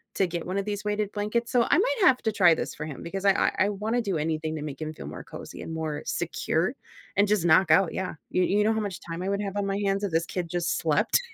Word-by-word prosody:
to 195 - +3
get 170 -1 -4
one 185 +2 -2
of 200 - -1
these 205 -1 -3
weighted 210 -1 -1
blankets, 215 +3 -1
so 245 -2 +4
I - - +5
might - - +1
have 255 - +6
to 220 - +1
try 175 -5 +6
this - - -4
for 150 - -5
him 145 - -7
because 195 +3 -4
I 200 - +7
I - - +2 0.2
I - - 0
wanna 215 +4 -1
do 195 -6 -1
anything 155 0 -2
to 150 - -5
make 145 -1 -6
him 155 0 -4
feel - - -9
more - - -7
cozy - - -9
and - - -6
more 155 -2 -3
secure - - -1 0.4
and 205 +1 +5
just 205 -4 +1
knock 170 +1 +5
out, 165 +2 +4
yeah, 185 -2 -3 0.2
you 185 - +2
you 205 +3 +2
know 220 +1 +3
how 220 - 0
much 200 -4 -4
time 165 0 -6
I 190 - -1
would 200 +1 0
have 200 0 -4
on 200 - 0
my 195 0 -1
hands 195 +1 0
if 200 - -1
this 165 +1 +1
kid 175 -3 -3
just 175 0 -1
slept? - - +2
195 Hz, 285 wpm, -27 LUFS, 165-210 Hz, 0.4 s, I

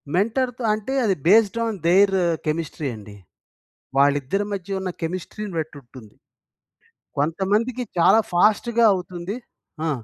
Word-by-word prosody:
మెంటర్‌తో 240 +5 0
అంటే 215 +5 -4
అది 195 -3 +2
based 220 +3 +5
on 225 -3 -3
their 195 +3 +5 0.3
chemistry 155 -2 -2
అండి. 105 -1 -12 0.8
వాళ్ళిద్దరి 145 +8 +2
మధ్య 195 0 -4
ఉన్న 190 -1 -3
కెమిస్ట్రీ‌ని 185 +4 -5
బట్టుంటుంది. 130 -7 -9 1.0
కొంతమందికి 200 - 0
చాలా 170 +6 +6
ఫాస్ట్‌గా 220 +5 +3
అవుతుంది. 180 +1 -5 0.5
ఆ! - - +1
190 Hz, 110 wpm, -23 LUFS, 160-215 Hz, 1.0 s, చాలా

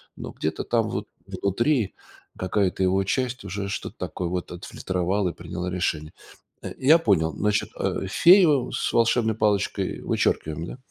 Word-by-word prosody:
но - - -7
где-то 80 0 -3
там 115 -2 0
вот 105 -1 -4 0.2
внутри 100 +5 0 0.4
какая-то 95 0 0
его 95 +1 +2
часть 125 +3 -2
уже 100 0 -4
что-то 105 - -5
такое 90 - -4
вот 90 0 -4
отфильтровала 90 +2 -2
и - - -6
приняла 85 +1 -5
решение. 80 -4 -2 0.5
Э, - - -5
я 150 +5 +6
понял, 80 - +2
значит, 105 0 0
э, - - -1
фею 165 - +5
с - - -1
волшебной 115 -1 +3
палочкой 105 -2 0
вычеркиваем, 80 +1 -1
да? - - -8
100 Hz, 150 wpm, -25 LUFS, 90-115 Hz, 0.5 s, я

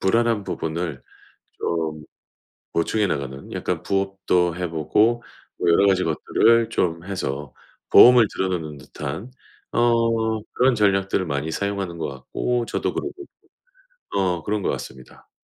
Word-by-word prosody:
불안한 115 +1 +2
부분을 80 -4 -4 0.6
좀 80 -2 -2 0.7
보충해 105 +5 +1
나가는 70 -4 -4
약간 - - -2
부업도 95 -3 0
해 90 0 -3
보고 105 +9 +2 0.4
뭐 - - +2
여러 95 +4 +5
가지 95 -2 +3
것들을 115 +8 +3
좀 85 -1 -1
해서 75 -8 -4 0.4
보험을 120 -2 +8
들어 95 - -1
놓는 80 -5 -4
듯한 75 - -7 0.4
어 115 -2 +2
그런 130 0 +3
전략들을 95 -2 +2
많이 70 0 -2
사용하는 100 -1 -3
것 80 - -3
같고 115 - -2
저도 - - -2
그러고 - - -3 0.8
있고 - - -6
어 90 -4 0
그런 105 +3 -1
것 - - -1
같습니다. 65 -1 -9
95 Hz, 280 characters per minute, -23 LUFS, 80-110 Hz, 0.8 s, 보험을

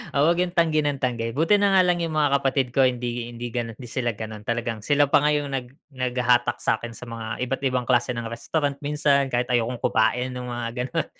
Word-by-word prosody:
oo, - - +2
huwag 170 +2 +3
yung 180 -1 -1
tanggi 160 -3 +3
ng 145 -2 -2
tanggi. 115 -2 -1
Buti 165 +8 +4
na 200 -1 +3
nga 185 - +7
lang 175 -1 +2
yung 165 -1 -2
mga 145 -2 +3
kapatid 135 -1 +1
ko 135 - +4
hindi 120 -1 -3
hindi 120 0 -6
gano'n 115 -2 -3
hindi 120 -3 -10
sila 120 -2 -1
gano'n. 110 -1 -7
Talagang 115 -1 -2
sila 145 -1 +3
pa - - +6
nga 150 0 +3
yung 145 -1 -2
nag 125 -2 -2 0.3
naghahatak 125 -1 +1
sakin 115 +1 -1
sa - - -9
mga 115 -1 -6 0.2
iba't 135 +2 -3
ibang 125 -1 -1
klase 125 0 +2
ng 120 - -4
restaurant 140 +4 -2
minsan, 145 -1 +2
kahit 125 +1 -1
ayokong 120 0 0
kumain 125 +3 +1
ng 125 0 -5
mga 120 -1 -3 0.2
gano'n. - - -1
125 Hz, 225 wpm, -24 LUFS, 120-145 Hz, 0.3 s, nga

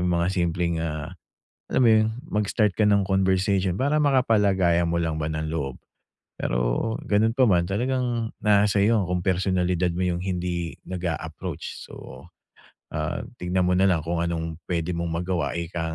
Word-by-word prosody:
'yong 90 0 +1
mga 85 +1 +1
simpleng, 85 -2 0
ah, 80 0 -4 0.6
alam - - +1
mo - - +6
'yon, 110 0 +4 0.2
mag-start 105 0 +1
ka 105 +2 +2
ng 100 -1 +3
conversation, 95 -1 +1
para 145 +6 +1
makapalagayan 100 - +3
mo 85 - 0
lang 80 -2 -1
ba 75 - -1
ng 80 0 -3
loob. 70 -5 -3 0.6
Pero, - - 0
gano'n 110 +3 +2
pa 130 - +5
man, 90 -6 +3
talagang 120 +1 -1
nasa 105 -1 +3
sa'yo 115 +3 +4
'yon 105 - +2
kung 90 0 -1
personalidad 90 -1 +1
mo 85 - -4
'yong 90 +1 -2
hindi 90 -2 -3
nag-a-approach. 85 -2 -5
So, - - -11 0.7
ah, - - -3 0.2
tignan 90 +1 0
mo 90 - +2
na 95 - +4
lang 85 -4 +2
kung 85 +1 -2
anong 80 -1 -2
puwede 85 -1 -1
mong 85 -1 -2
magawa, 90 -6 -1
ika 85 -1 -3
90 Hz, 165 wpm, -25 LUFS, 85-100 Hz, 0.7 s, mo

